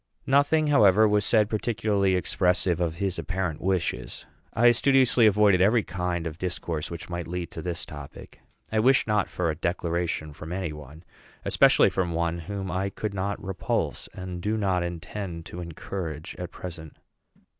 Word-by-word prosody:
Nothing, 145 +3 +3
however, 110 -7 +5
was 105 0 +2
said 105 0 +3
particularly 105 -3 +1
expressive 90 -1 +1
of 85 -2 0
his 95 0 -2
apparent 95 -4 -3
wishes. 95 -2 -2 0.3
I 120 +2 +5
studiously 130 -2 +4
avoided 100 -3 +4
every 110 +3 +4
kind 90 -2 -3
of 80 0 -5
discourse 85 -4 -3
which 85 0 -7
might 85 -1 -5
lead 90 0 -4
to 80 - -6
this 85 0 -4
topic. 75 -2 -11 0.3
I 110 - +1
wish 125 +3 +4
not 105 -2 +1
for 85 -3 -1
a - - -5
declaration 85 -2 -2
from 80 +4 -7
any 90 -4 -3
one, 75 +2 -11 0.4
especially - - +5
from 90 -3 -1
one 85 0 -1
whom 95 +2 -5
I 95 +2 -1
could 105 +1 -4
not 100 +1 -3
repulse 95 -1 -2
and 90 -1 -7
do 105 +4 0
not 95 -4 +1
intend 85 0 -5
to 90 - -7
encourage 85 -2 -6
at - - -5
present. 80 -4 -9
90 Hz, 165 wpm, -26 LUFS, 85-105 Hz, 0.4 s, however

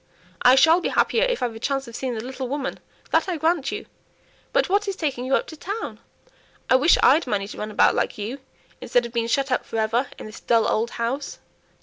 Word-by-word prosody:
"I 250 +1 +7
shall 325 +6 +5
be - - -1
happier 475 +2 +2
if - - -1
I've 240 -2 -1
a 225 - -9
chance 270 +2 -2
of 235 - -10
seeing 255 -2 -3
the 220 - -5
little 260 +1 -5
woman, 275 +1 -4 0.3
that - - +2
I 350 - -1
grant 320 -1 0
you. - - -5 0.7
But - - +2
what 405 +2 +1
is 395 - -2
taking 275 -8 -3
you 270 +1 +2
up - - 0
to 315 - -10
town? 405 +8 -5 0.7
I - - +7
wish 290 +6 +5
I'd 295 +1 +5
money 200 -4 -1
to - - -9
run 210 - -4
about 210 - +4
like - - -1
you, 220 +6 -5 0.4
instead 245 -1 +1
of 235 - -8
being 230 -1 0
shut 275 +3 0
up 255 - +1
for 225 - -6
ever 225 +4 +1
in - - -9
this 215 0 -10
dull 230 -2 +2
old 225 +2 0
house." 250 +5 -3
260 Hz, 235 wpm, -23 LUFS, 230-310 Hz, 0.7 s, I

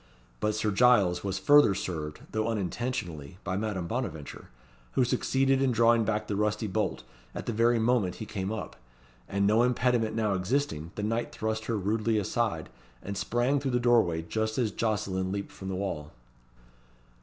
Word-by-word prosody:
But 105 0 0
Sir 105 0 0
Giles 100 -6 +4
was 95 -1 -2
further 105 +1 +6
served, 75 -5 -4
though 110 0 0
unintentionally, 95 - -3
by 95 -1 -2
Madame 100 -3 -2
Bonaventure, 85 - -5 0.4
who 130 - +3
succeeded 135 +2 +2
in 135 -2 +3
drawing 115 -1 +4
back 110 0 0
the 105 - -3
rusty 105 +1 0
bolt 105 0 -1 0.3
at - - -5
the 120 - -2
very 115 +2 +3
moment 110 -5 +1
he 110 - -6
came 100 -2 -4
up; 110 -1 -5 0.5
and 100 0 +1
no 110 +3 +4
impediment 120 -2 +2
now 110 -3 +1
existing, 95 - -1
the 105 - -4
knight 115 +3 -1
thrust 110 0 -3
her 115 - -1
rudely 110 +3 0
aside, 105 -5 -1 0.3
and 100 - -5
sprang 120 +7 +1
through 135 -1 -2
the 125 -1 +1
doorway 115 -10 +3
just 110 +5 -2
as 120 -5 +1
Jocelyn 95 -4 -1
leaped 100 0 -4
from 95 - -7
the 95 - -2
wall. 90 -6 -4
110 Hz, 170 wpm, -29 LUFS, 95-120 Hz, 0.5 s, further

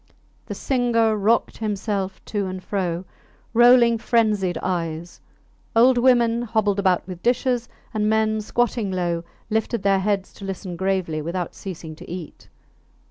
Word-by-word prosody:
The - - -5
singer 235 -4 +1
rocked 215 +3 +1
himself 200 -3 -3
to 205 -3 -2
and 185 0 -6
fro, 180 -3 -2 0.5
rolling 240 -1 +6
frenzied 215 -6 +1
eyes; 170 -1 -3 0.5
old 245 +2 +6
women 240 -2 +4
hobbled 215 -4 0
about 185 -3 +2
with 180 -2 -8
dishes, 245 0 +1 0.2
and 210 -1 +1
men, 220 0 +2
squatting 230 -2 0
low, 175 -2 -1 0.3
lifted 220 0 -1
their 195 -1 +3
heads 195 -1 -1
to - - -12
listen 190 -2 -5
gravely 185 -4 -1
without 170 +2 -3
ceasing 165 -4 -8
to - - -12
eat. 175 -2 -8
205 Hz, 135 wpm, -23 LUFS, 185-230 Hz, 0.5 s, rolling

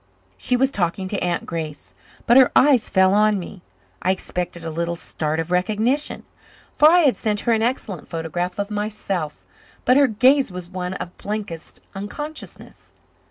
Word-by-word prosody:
She 250 - +1
was 265 +2 +2
talking 185 -1 -1
to 200 - -1
Aunt 175 -1 -1
Grace; 155 -3 -5 0.3
but 240 - +5
her 260 -1 +7
eyes 265 -5 +5
fell 190 0 +4
on 210 0 +4
me. 180 0 -8 0.4
I 185 - 0
expected 180 -2 -2
a 165 - -3
little 170 +2 -2
start 155 -1 -3
of 165 +2 -3
recognition, 215 +10 0 0.5
for 300 - +7
I 350 +2 +6
had 280 -6 +4
sent 210 -2 -1
her 235 - +2
an 220 - +1
excellent 220 - -2
photograph 170 +2 -3
of 200 +1 -3
myself; 195 - -3 0.4
but 255 +2 +5
her 285 -1 +6
gaze 255 +2 +3
was 180 -1 -7
one 180 0 -4
of 180 - -7
blankest 205 -6 -6
unconsciousness. 295 +11 -8
195 Hz, 165 wpm, -22 LUFS, 175-235 Hz, 0.5 s, her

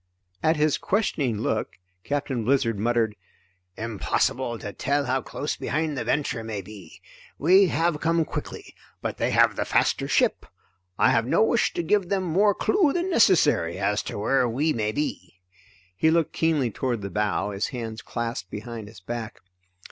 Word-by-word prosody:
At 160 +1 +3
his 150 -1 +2
questioning 150 - 0
look - - -2 0.3
Captain 140 -4 -2
Blizzard 120 -3 +1
muttered: 115 -1 +1 0.6
"Impossible 115 +3 -1
to 100 -2 -7
tell 140 +1 0
how 130 +1 0
close 145 +4 -4
behind 155 0 -2
the 130 - -2
Venture 140 -6 -1
may 105 -3 -5
be. 95 -4 -12 0.4
We 185 +6 +5
have 165 -2 0
come 165 0 +2
quickly, - - -7 0.3
but - - -3
they - - 0
have - - +4
the - - -1
faster - - +1
ship. - - +1 0.5
I - - +4
have 115 - +2
no 215 - +3
wish 235 +1 +2
to 175 - -1
give 190 +1 +1
them 195 -1 0
more 195 +4 +3
clue 375 -8 +2
than 355 +2 -1
necessary 155 - +3
as 105 +1 0
to - - -5
where 125 +4 +2
we 150 +7 +1
may 105 -2 -1
be." 95 - -4 0.6
He 160 - +3
looked 165 -1 +1
keenly 150 -7 +1
toward 120 -2 -2
the 100 - -5
bow, 105 +1 0
his 100 +1 -2
hands 115 -3 -6
clasped 115 -6 -4
behind 110 +1 -7
his 110 -3 -14
back. 115 +3 -6
130 Hz, 170 wpm, -25 LUFS, 110-160 Hz, 0.6 s, We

